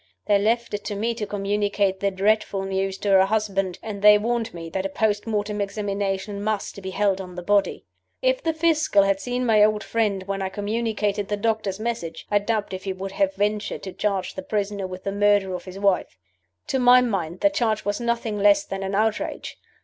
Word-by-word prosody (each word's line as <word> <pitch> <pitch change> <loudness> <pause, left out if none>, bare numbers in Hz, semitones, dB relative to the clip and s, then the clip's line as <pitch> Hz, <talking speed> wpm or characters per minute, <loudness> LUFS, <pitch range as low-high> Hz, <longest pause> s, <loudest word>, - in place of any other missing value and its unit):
They 205 -1 +4
left 230 +3 0
it 205 - -3
to 205 - -3
me 225 +4 -1
to 220 -3 -4
communicate 200 -1 0
the 200 - +1
dreadful 200 0 +1
news 195 0 -2
to 205 - -3
her 190 -1 +6
husband, 195 -3 -1
and 210 -3 -6
they 210 0 +8
warned 230 +1 -1
me 165 -1 -8
that 190 - -2
a 195 - -2
post 210 +2 0
mortem 210 -1 -1
examination 200 0 -2
must 205 -2 -3
be 190 - -5
held 195 0 +1
on 180 -1 -9
the 180 - -6
body. 200 +1 +1 0.3
"If - - +1
the 325 - +1
Fiscal 310 -9 +3
had 195 0 +1
seen 245 +4 -2
my 215 -3 +5
old 210 -1 +2
friend 210 -4 0
when 195 0 -3
I 190 - -1
communicated 205 0 -1
the 205 - -1
doctors' 215 -2 -1
message, 215 -8 -4
I 205 - +4
doubt 210 -1 -2
if 185 +1 -6
he 190 - -1
would 190 +1 -6
have 195 -1 0
ventured 210 +1 -1
to 190 - -6
charge 200 -3 -1
the 190 - -5
prisoner 200 -1 -2
with 185 0 -8
the 195 - -2
murder 205 -1 +2
of 180 - -6
his 185 0 -9
wife. 195 - +1 0.5
To 265 - +1
my 250 0 +7
mind 190 -8 -2
the 300 - +4
charge 220 -6 0
was 205 +2 -1
nothing 235 -3 -1
less 205 0 +4
than 195 0 -5
an 195 0 -2
outrage. 215 +1 -1
205 Hz, 210 wpm, -24 LUFS, 195-215 Hz, 0.5 s, they